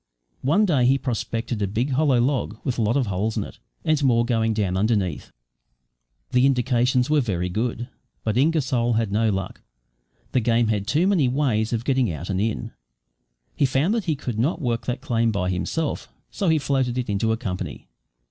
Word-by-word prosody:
One 165 +11 +3
day 140 -10 +3
he 135 +1 +4
prospected 115 -3 -3
a 100 - +1
big 115 +8 -1
hollow 135 -2 +3
log 125 -3 0
with 125 -3 -2
a - - +2
lot 110 +4 +2
of 135 - +1
holes 100 +2 -2
in - - 0
it, - - -11 0.3
and 155 -2 +2
more 120 -3 +3
going 115 -2 +1
down 100 -4 0
underneath. 95 -5 0 1.0
The 125 +2 +4
indications 125 0 +2
were 150 -1 +4
very 90 -7 -2
good, 115 +4 -2 0.4
but 110 -1 -1
Ingersoll 130 -4 +2
had 110 -2 0
no 110 +2 +2
luck. 95 -3 -3 0.7
The 130 - +2
game 115 -1 +2
had 105 -2 -1
too 160 +9 +2
many 185 -9 +3
ways 125 -5 0
of 115 0 -2
getting 130 -7 +2
out 85 +4 -5
and 95 0 0
in. 110 +1 -2 0.8
He 140 - +2
found 140 +10 +1
that 230 -4 -1
he 160 - +1
could 125 -5 -5
not 150 +8 +1
work 120 -6 -2
that 125 +1 -2
claim 115 -5 +1
by 90 -3 -1
himself, 145 - -2 0.2
so 195 -4 0
he 160 - +4
floated 130 -3 0
it 125 - -2
into 105 +2 0
a 110 - 0
company. 95 -6 -5
120 Hz, 195 wpm, -23 LUFS, 110-135 Hz, 1.0 s, he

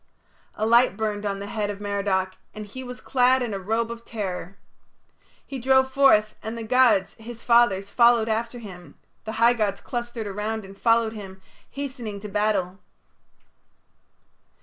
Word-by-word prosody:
A 215 - -1
light 235 -2 +4
burned 210 -1 -2
on 200 -1 -2
the 200 - -6
head 205 0 -3
of 205 -1 -5
Merodach, 200 -2 -1 0.2
and 215 0 -6
he 260 +6 -9
was 250 0 -8
clad 255 0 +2
in 230 -4 -3
a 195 - -3
robe 225 +4 -1
of 230 0 -8
terror. 195 -4 -5 0.9
He 270 - -6
drove 265 +1 +3
forth, 240 -6 +4
and 220 +2 -5
the 230 - -5
gods, 225 -5 +3
his 230 +1 -10
fathers, 235 -5 +3
followed 235 -2 +4
after 230 +2 -2
him: 185 -6 -11 0.3
the 220 - -4
high 230 +2 +4
gods 205 -4 -1
clustered 240 -2 -5
around 210 +1 -4
and 195 +1 -12
followed 230 +1 +2
him, 195 -3 -9 0.3
hastening 255 -7 -6
to 210 - -6
battle. 200 -3 0
220 Hz, 160 wpm, -24 LUFS, 200-240 Hz, 0.9 s, light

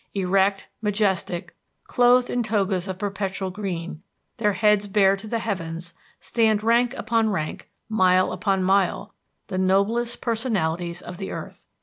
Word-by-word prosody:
Erect, 195 +1 +1
majestic, 195 -4 -1 0.3
clothed 245 0 +3
in 245 - 0
togas 200 -4 0
of 190 -1 -4
perpetual 195 -1 -3
green, 175 -5 -5 0.4
their 210 -2 +1
heads 210 -1 +3
bared 195 -1 +3
to 215 - -8
the 230 - -1
heavens, 170 -6 -4 0.3
stand 215 +2 +1
rank 240 +3 +3
upon 225 -1 +1
rank, 155 -6 -4 0.2
mile 185 -4 +3
upon 195 -2 0
mile, 190 0 +1 0.3
the 185 - -3
noblest 215 +6 +1
personalities 180 -8 -1
of 175 - -8
the 195 - -5
earth. - - -8
195 Hz, 135 wpm, -24 LUFS, 185-220 Hz, 0.4 s, clothed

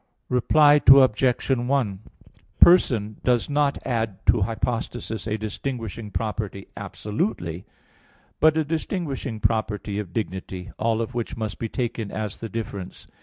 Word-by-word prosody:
Reply 145 +4 +5
Obj. 130 -2 +6
1: 120 -5 0 0.6
Person 115 - +5
does 125 +2 +1
not 145 -1 +2
add 110 -5 -1
to - - +4
hypostasis 115 0 -3
a 105 0 -1
distinguishing 110 0 -5
property 105 -2 -4
absolutely, 105 -5 -3 0.7
but 155 0 +5
a 160 - +3
distinguishing 150 - -3
property 105 -2 -1
of 100 -4 -6
dignity, 95 -2 -5
all 115 0 +1
of 115 - -4
which 120 -2 -4
must 110 -3 -4
be 115 - -3
taken 120 -4 -3
as 105 -2 -4
the 115 - -5
difference. 100 -4 -6
115 Hz, 125 wpm, -24 LUFS, 105-130 Hz, 0.7 s, Obj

